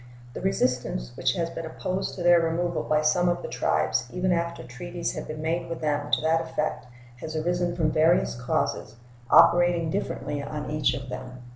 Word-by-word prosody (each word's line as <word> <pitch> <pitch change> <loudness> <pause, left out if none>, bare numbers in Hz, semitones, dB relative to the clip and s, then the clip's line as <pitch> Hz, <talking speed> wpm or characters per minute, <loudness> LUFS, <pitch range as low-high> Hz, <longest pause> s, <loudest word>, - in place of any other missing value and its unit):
The - - -6
resistance 125 - -1
which - - +1
has 165 -1 -2
been 165 - -6
opposed 185 +4 -3
to 180 - -5
their 175 0 +6
removal 170 +1 0
by 155 0 +1
some 175 +4 +3
of 175 - -1
the - - -4
tribes 75 - 0
even 180 0 0
after 170 -4 -1
treaties 170 +8 -5
had - - -6
been 155 0 -6
made 165 +2 -1
with 165 - -4
them 145 -1 -1
to - - +2
that 160 +1 +2
effect 155 -5 -3 0.3
has 155 +5 -7
arisen 175 +2 0
from 160 -3 +1
various 160 +4 +3
causes, 120 -2 -2 0.3
operating 170 -1 +5
differently 145 -1 -3
on 150 +1 -5
each 150 -5 +1
of 130 0 -7
them. 125 0 -8
160 Hz, 185 wpm, -26 LUFS, 135-175 Hz, 0.3 s, their